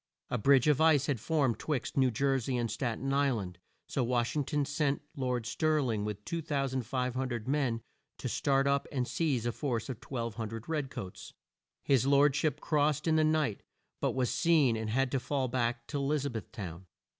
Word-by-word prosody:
A 125 - 0
bridge 135 +4 +5
of 150 -1 +4
ice 155 -4 +5
had 140 -5 -1
formed 140 -2 +1
'twixt 150 -6 -2
New 130 -2 +4
Jer 135 +3 +1
sey 125 +1 -2
and 120 -2 -1
Stat 120 -4 -2
en 135 +2 -2
Isl 140 -4 +2
and, 90 -2 -7 0.3
so 130 - -1
Wash 120 +1 0
ing 150 - +1
ton 145 +1 0
sent 145 -1 0
Lord 125 -4 -1
Stir 155 +6 +1
ling 115 -7 -1
with 105 -1 -5
2,500 130 -5 -2
men 130 -5 0 0.3
to - - -4
start 135 -1 +1
up 140 0 +1
and 125 -3 -1
seize 140 -8 0
a 120 - +1
force 120 -2 -2
of 125 - -6
1,200 115 -2 -4
red 150 -4 -1
coats. 95 -6 -8 0.5
His 135 -2 +3
lord 140 0 +5
ship 155 -2 0
crossed 150 -1 +1
in 160 - +4
the 155 - +4
night, 155 -8 +1 0.4
but - - 0
was 130 -2 +1
seen 155 -8 +3
and 110 -1 -3
had 130 +3 +1
to 135 - +1
fall 135 0 -1
back 120 -1 -1
to 145 - -2
E - - -1
liz 140 0 0
a 140 - -1
beth 110 -3 -6
town. 90 -2 -7
130 Hz, 200 wpm, -31 LUFS, 120-145 Hz, 0.5 s, bridge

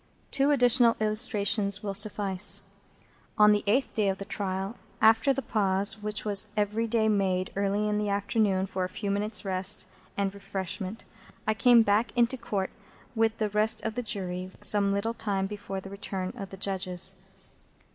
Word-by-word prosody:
Two 275 +1 +2
additional 245 -4 +4
illustrations 210 -2 +2
will 200 -1 -3
suffice. 200 -1 0 0.7
On 210 0 +6
the 210 0 +1
eighth 255 +7 +1
day 210 -3 +1
of 190 - -2
the 195 - -7
trial, 195 +2 -4 0.2
after 225 +5 +4
the 270 0 -2
pause 205 0 +3
which 210 0 -3
was 205 0 +2
every 210 +2 0
day 220 -1 +1
made 190 -3 0
early 200 +1 0
in 210 0 0
the 210 -1 -2
afternoon 200 -1 0
for 190 -1 -4
a 180 - -3
few 200 +1 -4
minutes' 210 +1 -1
rest 190 +1 +1 0.3
and 200 -1 -1
refreshment, 195 +1 -6 0.4
I 215 - +1
came 235 +2 +5
back 210 +2 +1
into 240 +2 +2
Court 200 -6 -3 0.4
with 225 -1 +1
the 215 -1 -1
rest 215 +2 +1
of 220 - -3
the 245 - -3
Jury 185 -4 -4
some 205 -1 +4
little 200 +3 -1
time 200 -4 -2
before 195 -1 -6
the 195 0 -10
return 190 -2 -5
of 195 -1 -7
the 195 - -10
Judges. 185 -2 -1
205 Hz, 170 wpm, -27 LUFS, 195-220 Hz, 0.7 s, On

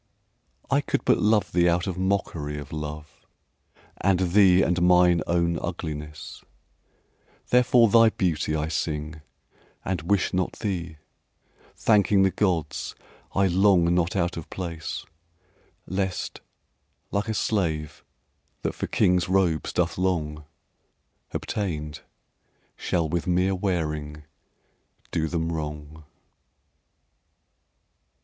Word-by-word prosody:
I - - +4
could - - -2
but - - +4
love 105 0 +2
thee 85 0 +3
out 85 +1 +1
of 95 - -3
mockery 90 -6 -2
Of 70 -2 -8
love 75 0 -7 0.8
and 95 -2 +1
thee 95 -1 +6
and 90 0 +1
mine 90 -1 +5
own 85 -1 +1
ugliness; 75 -3 -6 1.1
Therefore 125 -1 +5
thy 115 +1 +6
beauty 80 -7 -1
I 75 0 -1
sing 75 -1 -3 0.6
and 90 -3 -1
wish 95 +4 0
not 90 0 0
thee, 85 -7 -4 0.8
Thanking 100 -2 +3
the 95 - +3
Gods 90 -5 -1 0.4
I 95 - +3
long 90 -2 +4
not 90 0 +1
out 90 -2 0
of 85 - -7
place, 85 -3 -5 0.8
Lest, 95 0 -3 0.7
like 100 +2 -1
a 110 - -1
slave 80 -9 -1 0.6
that - - -1
for - - -4
kings' 90 -1 +2
robes 90 -5 +1
doth 85 0 -1
long, 75 -5 -1 0.9
Obtained, 75 -7 -4 0.7
shall 85 -3 -1
with 85 +2 -2
mere 90 +2 +2
wearing 75 -6 -2 0.9
do 80 - 0
them 80 0 -2
wrong. 75 -1 -6
85 Hz, 110 wpm, -25 LUFS, 80-95 Hz, 1.1 s, thee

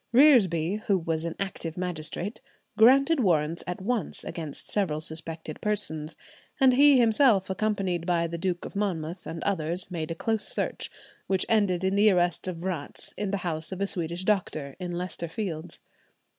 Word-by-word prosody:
Reresby, 210 - +5
who 200 - +4
was 165 -1 -1
an 170 - -3
active 185 -4 -4
magistrate, 180 +3 -3 0.3
granted 275 +8 +5
warrants 165 -6 +1
at 180 - -4
once 230 +2 -1
against 155 -4 -6
several 180 -7 0
suspected 160 0 -5
persons, 160 -7 -2 0.4
and 265 -2 +6
he 285 +1 +7
himself, 225 -4 +4
accompanied 190 -4 -1
by 170 -1 +2
the 170 0 -4
Duke 180 -1 -2
of - - -9
Monmouth 180 -3 -3
and 165 0 -5
others, 180 -1 -1
made 160 -3 -3
a 165 - -3
close 220 +4 -1
search, - - -1 0.4
which 190 -1 +1
ended 200 -5 +2
in 190 0 +1
the 205 +2 +5
arrest 175 -2 +1
of 180 -2 -3
Vratz 170 -4 -4
in 205 -1 -2
the 200 - 0
house 160 -1 -3
of 190 - -5
a 200 - +1
Swedish 175 -1 -3
doctor, 155 -9 -1
in 180 -1 -4
Leicester 175 -1 -4
Fields. 165 -2 -5
180 Hz, 170 wpm, -27 LUFS, 165-205 Hz, 0.4 s, he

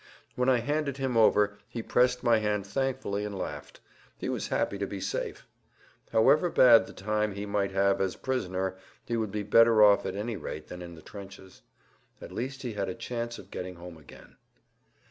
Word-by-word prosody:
When 125 +1 +1
I 125 -2 +3
handed 145 +1 -1
him 135 -3 -2
over 105 -2 +4
he 115 - -5
pressed 125 +1 +2
my 115 -2 +4
hand 105 -2 -1
thankfully 130 -3 -2
and 105 -1 -5
laughed; 90 - -7 0.4
he - - -4
was - - -2
happy 100 - -1
to 100 - -2
be 100 - -6
safe. - - -4 0.7
However 140 +10 +4
bad 115 - +6
the - - -11
time 105 +1 -1
he 100 0 -4
might 100 -1 0
have 100 0 +2
as 95 -1 0
prisoner 95 -7 -2 0.3
he 120 - -2
would 110 -3 -1
be 105 0 -3
better 115 +1 +6
off 105 -1 +6
at - - -4
any 110 +2 -3
rate 75 -2 -7
than 90 - -8
in 85 -1 -9
the 80 - -14
trenches. 95 -2 -12 0.6
At - - -10
least 130 +7 -5
he 120 -3 -4
had 100 -2 -2
a - - -4
chance 120 0 -4
of - - -13
getting 90 0 -6
home 85 -1 -11
again. 75 - -16
105 Hz, 195 wpm, -28 LUFS, 95-120 Hz, 0.7 s, bad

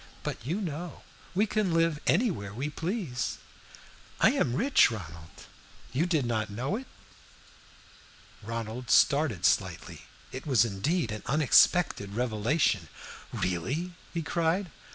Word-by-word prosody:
But, - - -4
you 165 - -2
know, 170 -1 -5 0.3
we 205 +4 +3
can 210 -5 0
live 165 -2 +2
anywhere 165 - +1
we 140 +5 -3
please. 155 - -3 0.8
I - - +6
am 120 - 0
rich, 265 - +5
Ronald 85 -7 -9 0.5
you 155 +7 +1
did 160 -7 +1
not 110 -2 -1
know 125 - -2
it?" 260 +4 -6 1.5
Ronald 115 +2 -5
started 140 - +3
slightly. - - 0 0.2
It 130 +4 -7
was 125 -5 +4
indeed 115 - -1
an 110 - -5
unexpected 140 - +3
revelation. 115 - +1 0.4
"Really?" 135 - -2 0.2
he 170 -1 -3
cried. 170 +3 0
140 Hz, 120 wpm, -29 LUFS, 110-170 Hz, 1.5 s, I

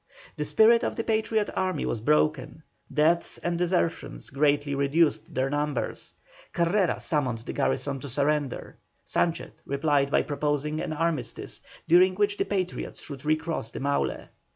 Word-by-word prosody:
The 150 - -3
spirit 220 +10 +5
of - - -1
the 230 - -2
Patriot 220 -1 0
army 185 -5 -1
was 115 - -2
broken, 150 +2 +1 0.3
deaths 165 +3 +2
and 175 0 -2
desertions 175 -1 -1
greatly 145 0 +2
reduced 140 +3 +1
their 130 +1 0
numbers. 145 0 -2 0.4
Carrera 175 +2 +1
summoned 135 -7 -1
the - - -5
garrison 140 -1 -1
to 140 - -7
surrender. 145 +1 -1 0.3
Sanchez 170 -1 0
replied 140 0 +1
by - - +3
proposing 150 +1 -1
an - - -3
armistice, 165 0 -2 0.3
during 185 +2 +5
which 205 +1 +1
the - - 0
Patriots 185 -3 -3
should 140 -3 -8
recross 155 -5 -1
the - - -7
Maule. 140 +1 -1
150 Hz, 145 wpm, -27 LUFS, 140-175 Hz, 0.4 s, spirit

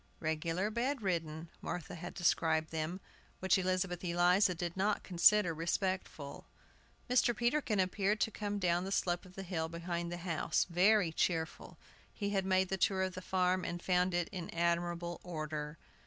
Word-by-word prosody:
"Regular 165 +5 -1
bed 250 +2 -1
ridden," 165 -3 -2
Martha 180 +2 -5
had 175 +1 -7
described 160 -3 +1
them, 160 +3 -3 0.4
which 190 0 +3
Elizabeth 185 -1 -1
Eliza 180 +2 +3
did 170 -1 -4
not 195 +2 0
consider 180 0 +5
respectful. 165 -3 -3 0.6
Mr. 245 -1 +3
Peterkin 240 -3 +1
appeared 200 +3 +2
coming 205 -1 -3
down 175 -2 +1
the 190 - -4
slope 175 -2 0
of 185 - -17
the 195 - -5
hill 165 -3 -2
behind 170 0 -3
the 175 - -3
house, 170 -2 0
very 185 +1 +4
cheerful. 160 0 -2 0.3
He 200 -1 -3
had 195 -2 0
made 190 -1 +2
the 190 - -1
tour 190 0 +2
of 185 -1 -2
the 185 - -6
farm, 185 0 +1
and 175 - -3
found 180 0 +1
it 175 -1 +1
in 180 -4 -5
admirable 170 0 -1
order. 155 -2 -5
180 Hz, 160 wpm, -34 LUFS, 170-190 Hz, 0.6 s, consider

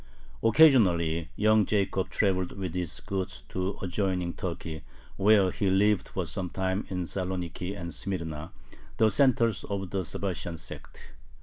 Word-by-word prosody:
Occasionally 90 - +5
young 110 0 +4
Jacob 95 -2 0
traveled 95 0 +1
with 95 -4 -4
his 90 -3 -3
goods 95 -1 -4
to 95 +1 -2
adjoining 90 -2 -1
Turkey, 80 -3 -5 0.3
where 100 -2 +4
he 100 - 0
lived 100 0 +3
for 95 - -3
some 90 +2 -4
time 95 +2 -2
in 90 -2 -2
Saloniki 90 +1 -3
and 85 -1 -5
Smyrna, 80 -2 -4 0.5
the 110 -1 +4
centers 115 -6 +3
of 95 -2 -4
the 95 -1 -1
Sabbatian 85 -1 -4
sect. - - -10
95 Hz, 135 wpm, -28 LUFS, 85-100 Hz, 0.5 s, Occasionally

